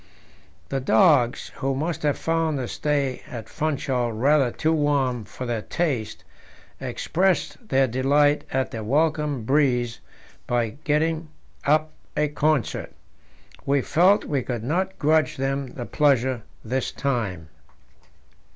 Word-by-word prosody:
The 135 Hz, -, -1 dB
dogs, 135 Hz, -, +3 dB
who 135 Hz, 0 st, -1 dB
must 160 Hz, +5 st, -2 dB
have 145 Hz, -2 st, +1 dB
found 165 Hz, -2 st, 0 dB
the 130 Hz, -2 st, -3 dB
stay 140 Hz, -3 st, -1 dB
at 115 Hz, -3 st, -7 dB
Funchal 135 Hz, -5 st, -1 dB
rather 135 Hz, +4 st, +3 dB
too 160 Hz, +6 st, 0 dB
warm 140 Hz, -6 st, +1 dB
for 125 Hz, -, -7 dB
their 120 Hz, -3 st, -2 dB
taste, 135 Hz, -7 st, -2 dB, 0.6 s
expressed 190 Hz, +5 st, -1 dB
their 135 Hz, 0 st, +4 dB
delight 140 Hz, +4 st, +2 dB
at 130 Hz, -2 st, 0 dB
the 110 Hz, -1 st, -5 dB
welcome 150 Hz, +1 st, +1 dB
breeze 125 Hz, -3 st, +1 dB, 0.5 s
by 120 Hz, -2 st, +1 dB, 0.2 s
getting 160 Hz, +2 st, +1 dB, 0.4 s
up 155 Hz, +2 st, +3 dB, 0.3 s
a 150 Hz, 0 st, +2 dB
concert. 150 Hz, -3 st, 0 dB, 0.7 s
We 140 Hz, -1 st, +1 dB
felt 190 Hz, +5 st, +4 dB
we 140 Hz, -3 st, 0 dB
could 120 Hz, -2 st, -4 dB
not 185 Hz, +8 st, -1 dB
grudge 155 Hz, +1 st, +2 dB
them 135 Hz, 0 st, -1 dB
the 125 Hz, -1 st, -7 dB
pleasure 130 Hz, -4 st, +2 dB, 0.2 s
this 130 Hz, +4 st, -1 dB
time. 100 Hz, -, -2 dB
140 Hz, 125 wpm, -24 LUFS, 125-155 Hz, 0.7 s, their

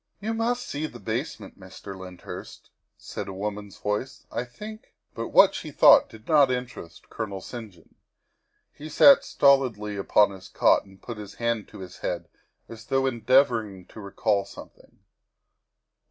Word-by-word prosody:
" -, -, -49 dB
You 215 Hz, +2 st, -3 dB
must 240 Hz, +2 st, -1 dB
see 150 Hz, +2 st, -3 dB
the 120 Hz, -, -12 dB
basement, 115 Hz, -4 st, -5 dB
Mr. 95 Hz, +1 st, -10 dB
Lyndhurst," 90 Hz, -1 st, -10 dB, 0.3 s
said 100 Hz, -, -7 dB
a 95 Hz, -, -6 dB
woman's 100 Hz, 0 st, -5 dB
voice. 105 Hz, +5 st, -4 dB
" -, -, -42 dB
I 120 Hz, -, -3 dB
think 210 Hz, -, -11 dB, 0.2 s
But -, -, -4 dB
what -, -, +6 dB
she -, -, -6 dB
thought -, -, +6 dB
did 110 Hz, 0 st, -15 dB
not 145 Hz, -4 st, +5 dB
interest 125 Hz, -9 st, -6 dB
Colonel 100 Hz, -4 st, -5 dB
St. 115 Hz, +2 st, -8 dB
John. 85 Hz, -3 st, -23 dB, 0.8 s
He 155 Hz, +2 st, -10 dB
sat 275 Hz, -, +7 dB
stolidly 120 Hz, -7 st, +2 dB
upon 100 Hz, +1 st, +3 dB
his 95 Hz, -1 st, -11 dB
cot -, -, +3 dB
and 95 Hz, -1 st, -18 dB
put 120 Hz, -2 st, -8 dB
his 105 Hz, -1 st, -9 dB
hand 115 Hz, -2 st, -2 dB
to -, -, -12 dB
his 90 Hz, -1 st, -10 dB
head -, -, -4 dB, 0.4 s
as 115 Hz, 0 st, -11 dB
though 135 Hz, 0 st, +1 dB
endeavoring 115 Hz, -6 st, +1 dB
to -, -, -12 dB
recall 100 Hz, 0 st, 0 dB
something. 100 Hz, -, -15 dB
110 Hz, 165 wpm, -25 LUFS, 100-130 Hz, 0.8 s, sat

